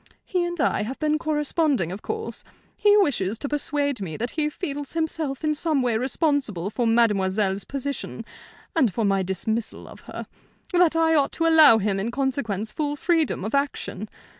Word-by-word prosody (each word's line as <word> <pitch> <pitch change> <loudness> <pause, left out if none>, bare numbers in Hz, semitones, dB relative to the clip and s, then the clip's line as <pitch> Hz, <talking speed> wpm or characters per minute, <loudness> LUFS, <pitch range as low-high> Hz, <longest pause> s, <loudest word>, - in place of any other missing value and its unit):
He 365 -2 0
and 345 -1 -4
I - - +1
have 240 +6 -4
been 305 0 0
corresponding, 295 - 0
of 195 +3 -6
course. 440 0 -5 0.3
He 415 0 +4
wishes 230 - +1
to 285 - -4
persuade 285 -3 -1
me 160 -5 -4
that 240 +2 -2
he 305 -2 0
feels 290 -4 -5
himself 320 -3 -2
in 305 0 +2
some 300 -3 0
way 240 -3 +1
responsible 250 - 0
for 240 +1 0
mademoiselle's 205 -3 +2
position, 280 0 -5 0.5
and 260 -10 +3
for 215 +4 -1
my 195 -1 +2
dismissal 210 +5 -3
of - - -12
her; - - -6 0.5
that 350 -2 +4
I 325 0 +3
ought 285 -3 +3
to 330 - 0
allow 315 -7 +8
him 200 -2 0
in 210 +4 -2
consequence 235 -5 -2
full 290 -1 -2
freedom 320 - 0
of 215 - -4
action. 280 -7 -2
275 Hz, 175 wpm, -24 LUFS, 215-310 Hz, 0.5 s, allow